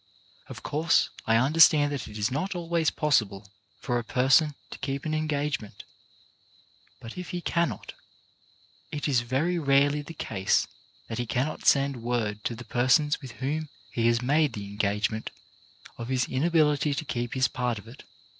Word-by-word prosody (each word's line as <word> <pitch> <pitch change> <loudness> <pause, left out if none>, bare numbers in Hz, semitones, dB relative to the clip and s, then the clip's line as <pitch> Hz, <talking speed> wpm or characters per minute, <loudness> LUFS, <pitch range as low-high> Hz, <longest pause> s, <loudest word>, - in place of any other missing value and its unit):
Of - - -10
course 155 +3 +2 0.2
I 110 - +4
understand 145 +3 +5
that 140 -5 -4
it 105 - -9
is 105 +3 0
not 185 +9 -2
always 170 -2 0
possible 110 -10 0 0.3
for 120 0 -1
a - - -5
person 135 +6 +3 0.2
to - - -8
keep 135 0 -4
an 155 - -1
engagement, 145 -9 -2 1.2
but 115 +10 -9
if 180 -3 -7
he 175 - -3
cannot, 170 -1 -2 1.0
it 150 0 -3
is 130 -4 +2
very 140 +9 0
rarely 140 0 +3
the 165 +3 -10
case 95 -9 0 0.4
that 115 +1 -5
he 120 - -2
cannot 135 +7 -2
send 140 -3 +3
word 110 -3 -2
to 120 - -1
the - - -10
person 135 +4 +3
with 130 -4 -9
whom 150 +4 -3 0.2
he 115 -1 +1
has 120 +1 +2
made 145 0 +2
the 105 -2 -6
engagement 105 +2 -1 0.7
of 115 - -5
his 130 -1 +1
inability 150 0 +2
to 155 - -4
keep 120 -2 -3
his 130 -1 +3
part 125 -1 -2
of 100 - -11
it. 125 +5 -12
135 Hz, 165 wpm, -27 LUFS, 115-150 Hz, 1.2 s, understand